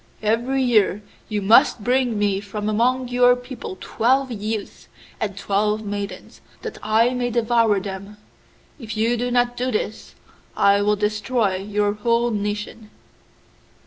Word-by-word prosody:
Every 240 +5 +1
year 210 -4 +2 0.3
you 210 -2 -2
must 215 +1 +5
bring 245 -2 +1
me 205 -2 +1
from 210 +1 -5
among 245 +4 +1
your 245 0 +5
people 245 -6 -8
twelve 260 +3 +1
youths 215 -1 -5 0.3
and 200 -2 -3
twelve 210 +2 0
maidens, 200 -2 -6 0.2
that 450 - -6
I 220 +3 +3
may 245 -1 -1
devour 230 -3 +2
them. 200 +1 -7 0.6
If 220 -3 -7
you 230 +2 +2
do 245 +1 -2
not 245 0 +1
do 250 +1 -2
this, 215 -1 -4 0.4
I 200 0 +4
will 210 +1 +2
destroy 210 0 0
your 205 +1 -1
whole 235 +3 +1
nation. 210 +1 -4
215 Hz, 140 wpm, -22 LUFS, 205-245 Hz, 0.6 s, must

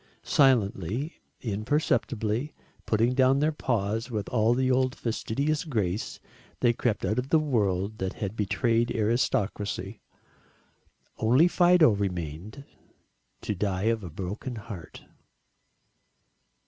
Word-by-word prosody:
Silently, 120 - +1 0.2
imperceptibly, 120 +1 -1 0.3
putting 115 +3 +2
down 130 +1 +4
their 150 +2 +2
paws 115 -5 -1
with 105 -5 -3
all 115 0 +2
the 130 0 +1
old 130 0 +2
fastidious 140 +7 -1
grace, 105 - -2 0.4
they 120 -1 +3
crept 115 -3 -1
out 105 +5 0
of 130 +2 -5
a 160 - +6
world 110 -8 0
that 95 0 -2
had 100 0 -5
betrayed 115 +3 +1
aristocracy. 105 -3 -1 1.2
Only 125 +9 +5
Fido 175 -5 +5
remained 95 - -4 0.8
to - - -2
die 95 -1 -2
of 110 -2 -5
a 90 - -6
broken 100 - -5
heart. 105 -6 -9
115 Hz, 110 wpm, -27 LUFS, 100-130 Hz, 1.2 s, a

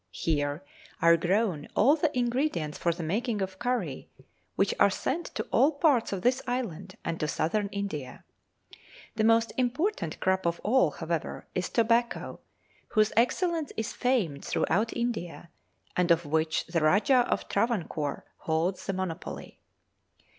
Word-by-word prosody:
Here 145 -1 -1 0.4
are 170 -2 +6
grown 175 -2 0
all 270 +8 +5
the 315 0 +1
ingredients 240 - 0
for 170 - 0
the 170 0 -5
making 215 +7 -1
of 190 -1 -4
curry, 240 - -2 0.5
which 195 - +2
are - - +6
sent 290 - -2
to - - -1
all 290 +4 +4
parts 280 -5 +2
of 190 -2 -3
this 255 +2 +2
island 195 -7 -3
and 165 - -2
to 155 - 0
Southern 200 +7 0
India. 195 -9 -5 0.9
The 220 - +1
most 225 +1 +3
important 255 - -1
crop 190 -1 +1
of 170 0 -1
all, 225 -5 +4
however, 160 +2 -4
is 180 - -2
tobacco, 235 +1 +1 0.5
whose 215 -1 +2
excellence 325 +6 +1
is 220 +3 -2
famed 215 - 0
throughout 215 +7 0
India, 195 -9 -3 0.4
and 180 -1 +1
of 170 0 +3
which 160 +2 0
the 170 -1 -1
Rajah 225 - +4
of - - -1
Travancore 175 - -1
holds 165 +4 -1
the 195 - 0
monopoly. 185 -2 -5
200 Hz, 145 wpm, -28 LUFS, 165-240 Hz, 0.9 s, are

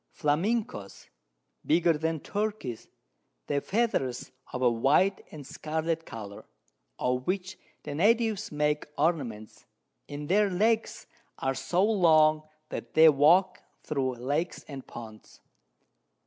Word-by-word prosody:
Flamencos, 155 - -1 0.5
bigger 170 +1 +3
than 160 0 -2
Turkeys, 205 - -4 0.6
their 140 - -1
Feathers 195 - -1 0.2
of 130 - -3
a 120 - +5
white 145 +12 +2
and 150 -3 -10
scarlet 160 +3 -3
Colour, 100 -3 -8 0.5
of 125 0 -1
which 190 0 -2 0.3
the - - -5
Natives 220 +4 +1
make 150 0 0
Ornaments, 135 -9 -2 0.4
and 145 0 -6
their 205 +3 +3
Legs 220 +5 0 0.3
are 135 - -1
so 180 +7 +1
long 160 -7 +4 0.3
that - - -7
they 160 0 +8
walk 155 +6 +4 0.2
thro' 135 -4 -1
Lakes 145 +8 -3
and 135 -3 -9
Ponds. 110 -2 -11
155 Hz, 115 wpm, -28 LUFS, 135-190 Hz, 0.6 s, they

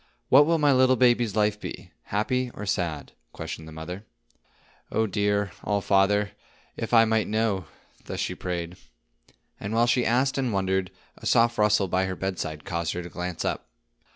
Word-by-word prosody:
"What 145 +3 +7
will 165 0 +3
my 145 -2 +4
little 130 0 +5
baby's 120 -4 +3
life 105 -1 +2
be,—happy 110 - -3
or 105 - -6
sad?" 85 -7 -2 0.2
questioned 80 - -7
the - - -10
mother. 85 +5 -7 0.9
"Oh, 110 - +2
dear 100 -1 0
All 105 -1 +1
Father, 100 +1 +2 0.4
if 115 - -5
I 115 -1 +7
might 110 -1 +1
know!" 110 -4 0 0.4
thus - - -5
she - - -1
prayed. 90 -1 -4 0.8
And 105 +3 -4
while 115 +1 +4
she 120 +1 +2
asked 130 +4 +1
and 130 -3 0
wondered, 95 -1 0 0.3
a - - -6
soft 115 -1 +3
rustle 105 -2 +3
by 95 +1 +1
her 95 0 -3
bedside 85 -5 -4
caused 85 -3 -2
her 90 - -4
to 85 - -8
glance 90 -1 -4
up. - - -2
105 Hz, 170 wpm, -26 LUFS, 90-115 Hz, 0.9 s, What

